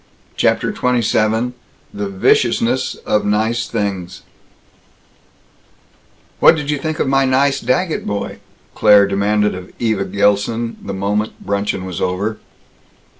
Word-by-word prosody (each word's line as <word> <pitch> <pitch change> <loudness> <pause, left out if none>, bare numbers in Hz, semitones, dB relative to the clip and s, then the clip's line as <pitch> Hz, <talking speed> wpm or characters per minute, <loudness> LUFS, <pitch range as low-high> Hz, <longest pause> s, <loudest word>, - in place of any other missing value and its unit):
CHAPTER - - +1
XXVII 115 -1 +1 0.4
THE 100 -1 -4
VICIOUSNESS 120 +6 +1
OF 105 - +1
NICE 110 +3 0
THINGS 100 -5 -4 2.2
"What - - +7
did 150 -1 -3
you 145 - -1
think 155 +2 -3
of - - 0
my 135 0 +3
nice 135 +2 +2
Daggett 155 +8 -1
boy?" 100 0 -4 0.3
Claire 105 -1 +6
demanded 105 +1 +1
of 95 0 -9
Eva 110 -4 0
Gilson, 105 +3 0
the - - -5
moment 105 +3 -2
bruncheon 100 -2 -2
was 90 -3 -5
over. 100 +4 -2
105 Hz, 120 wpm, -18 LUFS, 100-125 Hz, 2.2 s, What